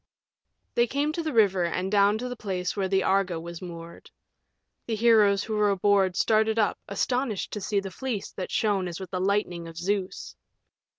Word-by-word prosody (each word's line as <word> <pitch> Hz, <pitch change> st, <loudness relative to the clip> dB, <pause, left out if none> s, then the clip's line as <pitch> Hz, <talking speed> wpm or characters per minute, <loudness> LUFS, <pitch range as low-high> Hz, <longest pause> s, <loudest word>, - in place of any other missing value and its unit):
They 240 Hz, 0 st, +3 dB
came 285 Hz, +4 st, 0 dB
to 335 Hz, -, -2 dB
the 315 Hz, -1 st, -3 dB
river 200 Hz, -7 st, +3 dB
and 185 Hz, +2 st, -2 dB
down 205 Hz, 0 st, +4 dB
to 250 Hz, +3 st, -4 dB
the 250 Hz, -, -5 dB
place 185 Hz, -5 st, -3 dB
where 195 Hz, -2 st, 0 dB
the 190 Hz, 0 st, +1 dB
Argo 190 Hz, -3 st, +1 dB
was 170 Hz, 0 st, -8 dB
moored. 170 Hz, -2 st, -9 dB, 0.8 s
The 225 Hz, -, -1 dB
heroes 215 Hz, -3 st, +4 dB
who 220 Hz, -, -3 dB
were 210 Hz, -1 st, +3 dB
aboard 195 Hz, -1 st, +2 dB
started 220 Hz, +2 st, +2 dB
up, 215 Hz, -2 st, +1 dB
astonished 230 Hz, +2 st, -1 dB
to 210 Hz, -, -4 dB
see 205 Hz, +1 st, 0 dB
the 195 Hz, -1 st, -6 dB
Fleece 230 Hz, 0 st, -4 dB
that 185 Hz, -, -6 dB
shone 200 Hz, -4 st, 0 dB
as 170 Hz, -2 st, -6 dB
with 190 Hz, -2 st, -8 dB
the 185 Hz, -1 st, -2 dB
lightning 185 Hz, -4 st, 0 dB
of 165 Hz, 0 st, -11 dB
Zeus. 190 Hz, +2 st, -3 dB
200 Hz, 190 wpm, -26 LUFS, 185-220 Hz, 0.8 s, down